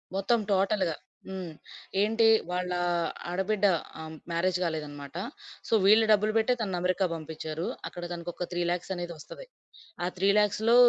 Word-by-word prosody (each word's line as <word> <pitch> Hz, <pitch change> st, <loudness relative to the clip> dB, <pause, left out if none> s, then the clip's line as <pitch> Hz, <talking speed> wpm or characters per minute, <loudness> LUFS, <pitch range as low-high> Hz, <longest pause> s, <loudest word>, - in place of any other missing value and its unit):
మొత్తం 195 Hz, +5 st, +2 dB
టోటల్‌గా. 190 Hz, -3 st, +2 dB, 0.3 s
హ్మ్. 185 Hz, -4 st, -5 dB, 0.5 s
ఏంటి 225 Hz, +2 st, +4 dB, 0.2 s
వాళ్ళా 180 Hz, 0 st, -1 dB, 0.5 s
ఆడబిడ్డ 190 Hz, +3 st, +1 dB, 0.3 s
ఆహ్, 160 Hz, 0 st, -7 dB, 0.2 s
మ్యారేజ్ 175 Hz, +2 st, +1 dB
గాలేదనమాట. 150 Hz, -3 st, -4 dB, 0.5 s
సో -, -, -1 dB
వీళ్ళు 215 Hz, +3 st, +7 dB
డబ్బులు 215 Hz, +1 st, +4 dB
బెట్టె 225 Hz, +3 st, +3 dB
తనని 190 Hz, -4 st, -1 dB
అమెరికా 185 Hz, +2 st, +2 dB
బంపించారు. 160 Hz, +1 st, -5 dB, 0.2 s
అక్కడ 175 Hz, -, -7 dB
తనకొక 175 Hz, +1 st, -4 dB
3,00,000 175 Hz, +1 st, -1 dB
అనేది 175 Hz, -1 st, -4 dB
ఒస్తది. 325 Hz, -, -10 dB, 0.6 s
ఆ -, -, +1 dB
3,00,000లో 210 Hz, +4 st, +3 dB
180 Hz, 125 wpm, -29 LUFS, 170-210 Hz, 0.6 s, వీళ్ళు